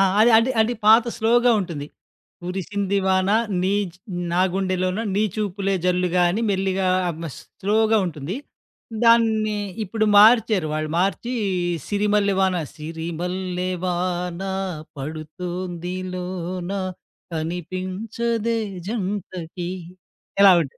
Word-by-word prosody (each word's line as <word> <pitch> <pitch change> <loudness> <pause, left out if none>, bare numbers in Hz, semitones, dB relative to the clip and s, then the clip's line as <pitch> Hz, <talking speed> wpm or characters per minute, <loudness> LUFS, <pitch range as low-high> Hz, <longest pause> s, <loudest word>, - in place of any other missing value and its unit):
ఆ! - - +6 0.4
అది 240 +3 0
అడి 230 +2 +2
పాత 225 +2 +8
స్లోగా 240 +2 +4
ఉంటుంది. 160 -6 -5 0.6
కురిసింది 195 +2 -2
వానా, 190 +2 +3 0.3
నీచ్ 195 -2 0 0.4
నాగుండెలోన 185 +1 +1
నీ 205 - +2
చూపులే 200 -2 -1
జల్లుగాని 180 +3 +2
మెల్లిగా 190 -1 0 0.2
అమస్ 165 -3 -7 0.2
స్లోగా 220 +2 +3
ఉంటుంది. 155 - -5 0.7
దాన్ని 220 -2 +4 0.3
ఇప్పుడు 215 +3 -1
మార్చారు. 215 -5 +6
వాళ్ళు 155 0 -2
మార్చి, 195 +6 0 0.5
సిరిమల్లె 205 -1 +2
వాన 190 -1 +3 0.2
సిరిమల్లె 175 +3 -4
వానా 180 +1 -2 0.4
పడుతోంది 175 +4 -5 0.2
లోన 180 0 -4 0.6
కనిపించదే 185 +8 -2 0.3
జంటకి. 185 -5 -4 0.7
ఇలా 195 -2 +9
ఉంటే 140 -4 -9
185 Hz, 90 wpm, -23 LUFS, 175-210 Hz, 0.7 s, ఇలా